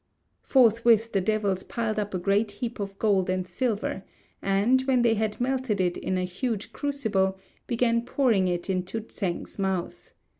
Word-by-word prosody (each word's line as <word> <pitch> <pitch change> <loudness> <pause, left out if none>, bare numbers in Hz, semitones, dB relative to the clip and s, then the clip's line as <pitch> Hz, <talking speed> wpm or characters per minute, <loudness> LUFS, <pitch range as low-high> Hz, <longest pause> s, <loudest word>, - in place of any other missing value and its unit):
Forthwith 230 -2 +4
the 195 - +1
devils 200 -1 0
piled 220 -1 -2
up 205 -2 -3
a - - +1
great 200 +3 +1
heap 235 +3 -5
of 195 -1 -5
gold 195 -4 +2
and 185 0 -1
silver, 205 0 -2 0.4
and, 205 +7 +3
when 255 -2 +3
they 230 -1 +4
had 215 -1 -1
melted 255 -4 0
it 180 -1 +1
in 185 - -2
a 185 - 0
huge 210 +4 -3
crucible, 220 -10 0 0.3
began 235 -1 +2
pouring 235 -6 +2
it 175 -1 -2
into 185 +3 -2
Tsêng's 195 -3 -5
mouth. 190 -3 -3
210 Hz, 160 wpm, -26 LUFS, 190-235 Hz, 0.4 s, Forthwith